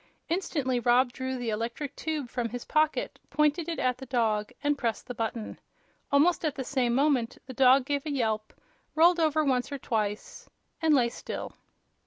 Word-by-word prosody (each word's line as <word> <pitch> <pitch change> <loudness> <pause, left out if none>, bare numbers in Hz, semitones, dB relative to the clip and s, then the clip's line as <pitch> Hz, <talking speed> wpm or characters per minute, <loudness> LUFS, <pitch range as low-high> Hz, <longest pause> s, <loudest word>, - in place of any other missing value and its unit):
Instantly 290 -8 0
Rob 245 +1 +3
drew 260 0 -3
the 240 -2 -2
electric 235 +6 -4
tube 305 -4 -3
from 240 -1 -3
his 245 +1 -6
pocket, 310 0 0
pointed 300 +3 +1
it 330 - -3
at 250 -1 0
the 265 - -9
dog 220 -4 0
and 290 0 +2
pressed 235 -5 -2
the 250 - -6
button. 225 -1 -4 0.5
Almost 310 +6 +4
at 305 -4 0
the 265 - -3
same 250 -2 0
moment 270 -4 +2
the 260 - -8
dog 260 +1 +5
gave 285 +1 -2
a - - -2
yelp, 220 -5 -1 0.4
rolled 340 +2 +5
over 310 -1 +2
once 255 -1 0
or 280 - -3
twice 215 -5 -3 0.3
and 315 -2 +4
lay 240 -3 +3
still. - - -6
260 Hz, 180 wpm, -28 LUFS, 240-295 Hz, 0.5 s, dog